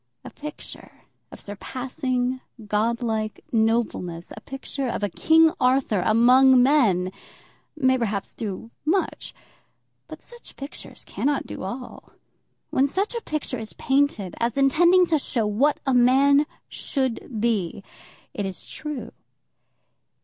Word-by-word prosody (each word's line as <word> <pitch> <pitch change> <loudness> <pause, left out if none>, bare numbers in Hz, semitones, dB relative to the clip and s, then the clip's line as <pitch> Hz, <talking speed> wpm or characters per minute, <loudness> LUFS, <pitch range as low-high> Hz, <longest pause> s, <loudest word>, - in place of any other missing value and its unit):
A - - -8
picture 300 +1 -10 0.3
of - - -11
surpassing 255 +4 -3 0.2
godlike 220 +1 -1
nobleness, 220 -7 0
a 215 - -10
picture 270 +1 -5
of 235 - -3
a 205 - +1
King 320 - +4
Arthur 250 -6 +2
among 250 +4 +6
men, 215 -11 +3 0.6
may 260 -3 +2
perhaps 210 -4 -2
do 220 +1 -6
much. 355 +6 -1 0.8
But - - -9
such 480 0 -14
pictures 275 +1 -8
cannot 285 0 -1
do - - -7
all. 240 +7 -7 0.6
When 270 +2 +3
such 390 - -1
a 470 - -3
picture 300 - -3
is 220 -1 -7
painted, 265 -9 0
as 235 +2 -1
intending 345 +7 +5
to 320 -3 +1
show 235 -5 -1
what 255 +8 +2
a 270 - +2
man 275 +4 +5 0.2
should 260 -4 -3
be, 205 -5 -1 0.5
it 205 - -3
is 190 - -7
true. 280 -7 -6
255 Hz, 125 wpm, -24 LUFS, 220-280 Hz, 0.8 s, among